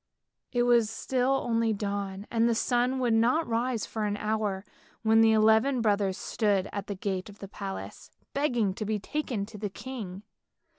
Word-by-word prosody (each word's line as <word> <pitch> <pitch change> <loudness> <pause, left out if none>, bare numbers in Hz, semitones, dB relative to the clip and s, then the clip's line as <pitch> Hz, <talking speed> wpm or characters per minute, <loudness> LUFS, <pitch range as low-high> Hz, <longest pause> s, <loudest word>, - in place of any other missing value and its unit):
It 245 -2 +2
was 240 -3 +4
still 260 +4 0
only 230 -1 +2
dawn, 200 -1 -3
and 230 0 +3
the 230 - +2
sun 245 +3 +1
would 245 -3 +1
not 245 +9 +3
rise 235 0 0
for 220 -1 -3
an 205 0 -1
hour 210 -2 -1 0.4
when 225 0 +5
the 225 0 +6
eleven 220 +4 +4
brothers 205 -4 +1
stood 205 -4 0
at 200 0 -4
the 200 - -3
gate 190 0 -3
of 205 - -13
the 195 - -8
palace, 195 0 -7 0.2
begging 245 -9 +1
to 215 - -5
be 215 +1 0
taken 235 -2 -3
to 210 0 -11
the 205 0 -2
king. 205 -4 -7
220 Hz, 180 wpm, -28 LUFS, 200-240 Hz, 0.4 s, the